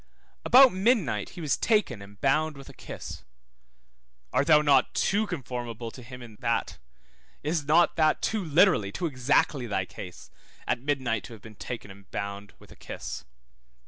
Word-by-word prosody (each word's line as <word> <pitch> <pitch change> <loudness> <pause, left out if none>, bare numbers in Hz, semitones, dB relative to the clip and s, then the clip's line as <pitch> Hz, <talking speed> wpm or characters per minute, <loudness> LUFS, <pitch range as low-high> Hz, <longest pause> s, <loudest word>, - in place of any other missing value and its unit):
About 260 -2 +7
midnight 185 - +1
he - - -5
was 150 -3 +1
taken 210 - +1
and 100 +1 -13
bound 150 +2 +1
with 135 - -12
a - - -12
kiss, - - -9 1.1
art 140 - +2
thou 150 -2 +6
not 140 -3 +3
too 210 +2 +1
conformable 120 - -5
to 125 - -11
him 125 +1 -10
in 110 -3 -13
that? 115 -2 -1 0.6
Is 150 0 -1
not 165 +3 +4
that 155 -1 +3
too 215 -3 -1
literally, 160 - +3
too 175 - -3
exactly 135 -2 +1
thy 95 -4 -1
case, 90 -1 -10 0.3
at - - 0
midnight 130 -6 -1
to 120 - -10
have 110 - -13
been 110 - -11
taken 105 0 -7
and 100 0 -16
bound 100 0 -6
with - - -18
a - - -13
kiss? - - -7
135 Hz, 170 wpm, -27 LUFS, 115-160 Hz, 1.1 s, About